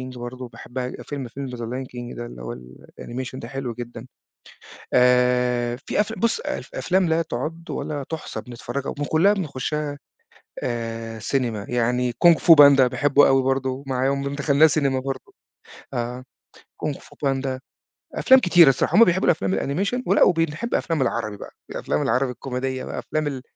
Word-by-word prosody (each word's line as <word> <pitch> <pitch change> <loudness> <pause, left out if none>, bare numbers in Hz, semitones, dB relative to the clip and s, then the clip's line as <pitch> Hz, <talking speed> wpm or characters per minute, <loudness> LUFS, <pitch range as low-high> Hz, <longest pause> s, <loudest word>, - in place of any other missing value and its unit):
King - - -9
برضه 125 +1 -7
باحبها 125 +1 -6
ج - - -8
فيلم 140 -3 -6
فيلم 135 +4 -6
The 125 -1 -7
Lion 125 +3 -4
King 120 0 -8
ده 120 - -5
اللي 60 - -10
هو - - -5 0.5
الanimation 130 +1 -6
ده 115 - -7
حلو 130 -2 -4
جدًا. 120 0 -8 0.9
آآ 125 -1 +3
في - - 0
أفـلا 220 +1 -2
بُص 230 - +1
أف - - -5
أفلام 190 - +1
لا 160 +1 +2
تُعد 165 +1 -5
ولا 145 -2 -4
تُحصى 160 -2 -5
بنتفرجها 125 +2 -6
وم - - -3
وكُلّها 160 +7 +3
بنخشها 150 -4 -3 0.7
آآ 115 -1 -4
سينما. 115 -3 -2
يعني 125 +1 +1
Kung 170 - +10
Fu 170 - +8
Panda 140 -2 +8
باحبه 140 +3 +4
أوي 135 0 +3
برضه 135 0 -1
معاهم، 135 +1 0
كنا 140 0 -3
دخَلناه 140 +2 +4
سينما 140 -4 +1
برضه. 135 0 -6 0.6
آه، 125 +1 -3 0.6
Kung 150 -2 -1
Fu - - -18
Panda، 135 -1 -1 0.6
أفلام 265 0 +6
كتيرة 175 - +6
الصراحة، 135 +5 +2
هُم 230 - +9
بيحبوا 185 0 +2
أفلام 95 - 0 0.3
الanimation، 245 +5 -1
ولأ 195 - +3
وبنحب 165 +6 +1
أفلام 165 -5 0
العربي 115 -4 -2
بقى، - - -10 0.2
الأفلام 75 - -2
العربي 125 +3 +1
الكوميدية 130 +1 -4
بقى، - - -6
أفلام 155 -1 -2
ال 135 -3 -4
130 Hz, 170 wpm, -23 LUFS, 125-150 Hz, 0.9 s, Kung